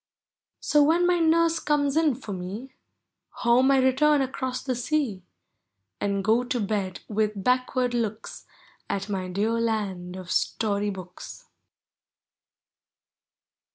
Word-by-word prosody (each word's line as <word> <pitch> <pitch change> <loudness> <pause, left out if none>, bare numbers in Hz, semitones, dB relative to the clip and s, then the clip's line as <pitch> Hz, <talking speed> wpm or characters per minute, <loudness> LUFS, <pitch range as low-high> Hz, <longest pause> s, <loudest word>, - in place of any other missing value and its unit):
So, 295 - +3
when 330 +4 +4
my 355 0 +3
nurse 330 0 +3
comes 285 -2 +1
in 315 -5 +3
for 225 -5 -7
me. 195 +8 -7 0.7
Home 245 +3 +5
I 275 - +5
return 270 +3 +3
across 260 -1 -4
the 260 - -1
sea, 245 -5 -1 0.8
And 200 -1 -1
go 225 +4 +3
to 250 0 -2
1mm] 200 -3 -3
with 210 -2 -1
backward 255 0 +1
looks 220 -3 -4 0.4
At 195 +1 -3
my 190 -2 -2
dear 200 +5 -1
land 195 -6 -2
of 185 -1 -8
Story 205 -2 0
books. 190 - -9
235 Hz, 120 wpm, -26 LUFS, 200-275 Hz, 0.8 s, Home